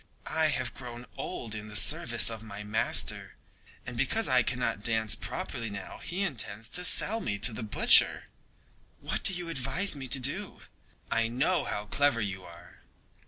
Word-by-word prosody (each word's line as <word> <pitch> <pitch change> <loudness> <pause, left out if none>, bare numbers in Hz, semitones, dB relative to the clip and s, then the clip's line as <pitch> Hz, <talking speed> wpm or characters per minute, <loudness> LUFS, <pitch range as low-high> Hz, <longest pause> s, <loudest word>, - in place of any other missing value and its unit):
I 160 0 +1
have 130 -5 -2
grown 120 -1 -9
old 110 -3 -5
in 110 0 -6
the 105 - -9
service 110 - +3
of 110 -1 -7
my 105 -2 -9
master, 105 +1 -1 0.5
and - - -7
because - - +1
I - - +4
cannot 100 - -2
dance 110 -1 +2
properly 115 -1 -5
now 100 -2 -8
he 185 +3 -3
intends 115 - +1
to 180 - -1
sell 220 +4 +3
me 100 - -2
to 115 +3 +2
the 110 - -5
butcher. 110 -2 +4 0.8
What - - -3
do - - +6
you 180 -2 -5
advise 155 +5 +1
me 135 -2 -7
to 135 +2 +5
do? 175 +10 0 0.5
I 115 0 +1
know 135 +10 0
how 105 0 -4
clever 140 +3 +1
you 100 -3 -4
are!" 85 0 -15
115 Hz, 170 wpm, -29 LUFS, 105-145 Hz, 0.8 s, do